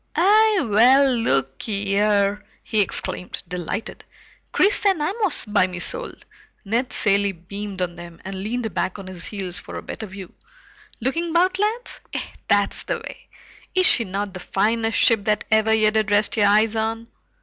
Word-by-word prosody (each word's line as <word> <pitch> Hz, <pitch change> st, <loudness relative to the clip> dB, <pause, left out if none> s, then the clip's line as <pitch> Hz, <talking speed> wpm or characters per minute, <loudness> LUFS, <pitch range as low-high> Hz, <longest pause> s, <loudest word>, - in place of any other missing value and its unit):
"Eh 425 Hz, +2 st, +4 dB
well, 255 Hz, +6 st, +5 dB
lookee 200 Hz, -, -1 dB
here!" 205 Hz, 0 st, +1 dB, 0.2 s
he 215 Hz, -2 st, +1 dB
exclaimed, 180 Hz, -1 st, -2 dB
delighted. 180 Hz, +4 st, -5 dB, 0.5 s
"Chris 405 Hz, +2 st, +3 dB
and 390 Hz, -5 st, +3 dB
Amos, 385 Hz, +3 st, 0 dB
by 205 Hz, -3 st, +2 dB
me 180 Hz, -1 st, -7 dB
soul!" -, -, 0 dB, 0.5 s
Ned 235 Hz, +5 st, -1 dB
Cilley 200 Hz, -1 st, +2 dB
beamed 190 Hz, +2 st, -6 dB
on 175 Hz, -1 st, -5 dB
them 175 Hz, -1 st, -11 dB
and 190 Hz, -, -5 dB
leaned 220 Hz, +2 st, -4 dB
back 185 Hz, +2 st, -2 dB
on 195 Hz, -, -9 dB
his 185 Hz, -2 st, -9 dB
heels 195 Hz, -5 st, -3 dB
for -, -, -10 dB
a -, -, -7 dB
better 220 Hz, -, -7 dB
view. 190 Hz, -1 st, -10 dB, 0.7 s
"Lookin' 330 Hz, +8 st, -1 dB
about, 360 Hz, +3 st, +2 dB
lads? 440 Hz, +4 st, -2 dB
Eh, -, -, -1 dB, 0.3 s
that's 205 Hz, 0 st, +2 dB
the -, -, -2 dB
way. -, -, -11 dB, 0.5 s
Is 370 Hz, 0 st, +4 dB
she 235 Hz, -, +4 dB
not 200 Hz, 0 st, -4 dB
the 185 Hz, -, -7 dB
finest 225 Hz, +5 st, 0 dB
ship 225 Hz, -4 st, +3 dB
that 210 Hz, -1 st, +1 dB
ever 220 Hz, 0 st, +3 dB
ye 215 Hz, -1 st, +4 dB
did 215 Hz, -1 st, 0 dB
rest 205 Hz, +1 st, +2 dB
your 205 Hz, -2 st, +3 dB
eyes 215 Hz, +2 st, +3 dB
on?" 225 Hz, +1 st, -2 dB
210 Hz, 170 wpm, -22 LUFS, 195-245 Hz, 0.7 s, well